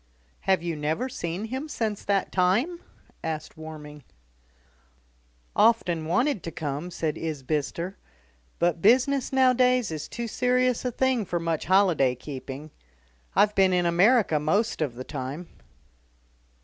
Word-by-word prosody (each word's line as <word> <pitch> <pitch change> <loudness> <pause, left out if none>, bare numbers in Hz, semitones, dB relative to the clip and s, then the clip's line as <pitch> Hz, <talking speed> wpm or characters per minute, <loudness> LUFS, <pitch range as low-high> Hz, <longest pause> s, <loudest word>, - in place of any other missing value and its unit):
"Have 190 -3 +3
you 170 -2 -2
never 155 - -1
seen 195 -6 -4
him 260 +7 -5
since 220 -7 -2
that 200 -2 0
time?" 215 - +1 0.4
asked 155 -1 -4
Warming. 150 -2 -10 1.5
"Often 175 -8 +3
wanted 225 - +1
to - - -5
come," 150 +2 -4
said 160 -3 -3
Isbister; 155 +4 -3 0.6
"but 170 -1 +1
business 255 +6 +3
nowadays 255 -4 +3
is 155 -2 -5
too 235 0 -5
serious 250 +1 +1
a 250 - 0
thing 260 -1 +1
for 175 -2 -2
much 165 -2 -2
holiday 175 -9 +3
keeping. 135 +2 -8 0.6
I've 210 0 +4
been 190 -2 +4
in 180 -1 +2
America 180 0 +4
most 200 +8 0
of 140 -6 -1
the 130 - -6
time." 145 +5 -6
180 Hz, 130 wpm, -26 LUFS, 155-235 Hz, 1.5 s, I've